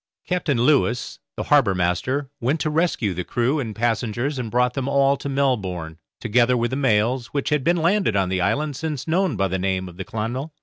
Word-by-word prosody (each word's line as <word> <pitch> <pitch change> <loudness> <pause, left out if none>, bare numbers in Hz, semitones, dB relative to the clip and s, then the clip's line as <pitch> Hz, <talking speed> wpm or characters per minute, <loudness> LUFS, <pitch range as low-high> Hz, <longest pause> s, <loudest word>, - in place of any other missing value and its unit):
Captain 175 -7 0
Lewis, 125 -2 +1 0.2
the - - -2
harbour 135 -10 +3
master, 95 - 0
went 135 +7 0
to 155 - -1
rescue 150 - 0
the 90 +1 -3
crew 125 - 0
and 110 -6 -4
passengers 120 +4 -1
and 120 -3 -3
brought 125 +2 +1
them 135 -1 -3
all 140 0 +3
to 140 - -6
Melbourne, 95 - -1 0.2
together 120 +2 +2
with 120 +1 0
the - - -1
mails, 125 -1 +1
which 140 -2 -2
had 150 -2 +1
been 175 +4 +2
landed 175 - +2
on 95 -2 +1
the 95 0 0
island 140 +10 0
since 150 -1 -4
known 175 -3 +1
by 95 -1 +1
the 95 0 -2
name 95 0 -1
of 90 -1 -12
the 95 - -4
'Clonmel'. 120 - -4
125 Hz, 210 wpm, -22 LUFS, 105-145 Hz, 0.2 s, harbour